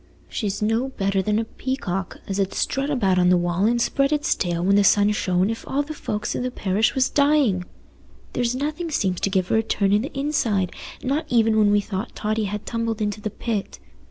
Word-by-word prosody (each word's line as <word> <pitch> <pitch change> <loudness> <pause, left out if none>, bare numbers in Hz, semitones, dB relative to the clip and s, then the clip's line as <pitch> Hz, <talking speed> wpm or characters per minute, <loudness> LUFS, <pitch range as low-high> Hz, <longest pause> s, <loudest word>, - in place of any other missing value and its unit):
"She's 205 -2 -3
no 225 +5 +1
better 195 -5 0
than 210 +2 0
a 225 - +1
peacock, 200 -8 -4
as 195 0 -2
'ud 195 0 0
strut 275 +1 0
about 195 -10 +2
on 180 0 +4
the 180 - +5
wall 175 +2 0
and 235 +2 +2
spread 275 +4 +1
its 300 -1 +2
tail 175 -2 -2
when 195 +1 +4
the 205 - +5
sun 205 +1 +4
shone 185 -1 +1
if 225 - -6
all 285 +2 0
the 305 +2 -7
folks 210 -7 -3
i' - - -1
the 250 0 -1
parish 210 -2 0
was 265 -1 +3
dying: 280 -11 +2 0.7
there's 245 0 0
nothing 300 +5 -3
seems 190 - 0
to - - +1
give 190 -2 0
her - - +3
a - - +4
turn 200 -3 +1
i' 205 - +5
th' 270 +4 -5
inside, 230 -10 0 0.3
not 290 +4 -1
even 225 -3 +3
when 215 -1 +4
we 205 0 +4
thought 200 +2 -5
Totty 215 0 -1
had 210 +1 -4
tumbled 230 -2 -2
into 210 0 -2
the 215 - -2
pit. 210 -1 -4
215 Hz, 220 wpm, -23 LUFS, 195-255 Hz, 0.7 s, the